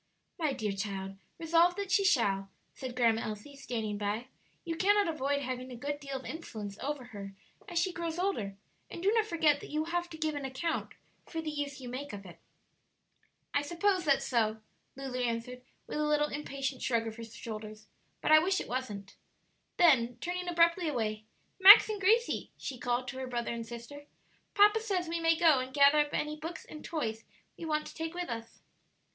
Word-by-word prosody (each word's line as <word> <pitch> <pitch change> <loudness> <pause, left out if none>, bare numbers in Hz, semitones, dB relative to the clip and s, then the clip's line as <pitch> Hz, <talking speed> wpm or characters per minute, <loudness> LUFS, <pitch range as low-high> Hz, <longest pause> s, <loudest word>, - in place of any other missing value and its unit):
"My 310 -3 +1
dear 215 -5 -2
child, 195 -1 -4 0.2
resolve 335 +2 +3
that 400 -1 -4
she 395 +1 +4
shall," 195 - +2 0.2
said 255 -2 -7
Grandma 230 -2 +3
Elsie, 215 +6 -6
standing 225 -6 -3
by; 210 +5 -2 0.4
"you 330 -1 -2
cannot 410 +3 +3
avoid 285 -3 0
having 255 0 -4
a - - -6
good 285 +4 -4
deal 275 -2 -5
of 265 - -10
influence 220 -11 -6
over 285 -1 -3
her 195 -1 -7 0.3
as 350 - -4
she 365 +1 +1
grows 335 -1 -3
older, 290 - -1 0.3
and 340 - -7
do 400 - +4
not 445 -1 +2
forget 320 -6 +3
that - - -9
you 305 - -1
will 325 +2 -4
have 350 0 -1
to 320 - -9
give 310 -1 -1
an 290 -1 -4
account 270 +5 -3 0.3
for 325 - -4
the 315 -1 -3
use 290 -2 -4
you 255 - -8
make 260 +2 -6
of 200 -1 -8
it." 175 -2 -12 1.1
"I 285 - +3
suppose 350 +5 +1
that's 280 -4 +2
so," 220 -3 +1 0.3
Lulu 265 -1 -5
answered, 245 +1 -2 0.2
with - - -4
a 300 - +1
little 300 0 +2
impatient 275 -2 -4
shrug 230 -2 +1
of 225 0 -6
her 230 - -7
shoulders; 215 -1 -8 0.4
"but - - +1
I 310 - +10
wish 375 +4 +1
it - - -5
wasn't." 210 -6 -5 0.6
Then, 245 -9 +5
turning 360 +3 -3
abruptly 340 0 +3
away, 215 -6 -2 0.3
"Max 395 +3 +11
and 420 -2 -3
Gracie," 455 +5 +2
she 260 -3 -6
called 245 +1 -1
to 260 +1 -6
her 260 - -4
brother 240 -1 -2
and 230 -1 -5
sister, 240 +5 -9 0.5
"papa 415 +2 +6
says 390 -6 -1
we 335 +1 -2
may 330 0 +3
go 320 -5 +5
and 255 0 -4
gather 280 +2 +6
up 295 0 +2
any 300 0 -1
books 325 +2 -7
and 305 - -10
toys 225 -9 -3 0.3
we 335 - -7
want 305 -1 0
to - - -9
take 325 +1 -5
with 355 -3 -3
us." 230 0 -7
280 Hz, 200 wpm, -31 LUFS, 235-335 Hz, 1.1 s, Max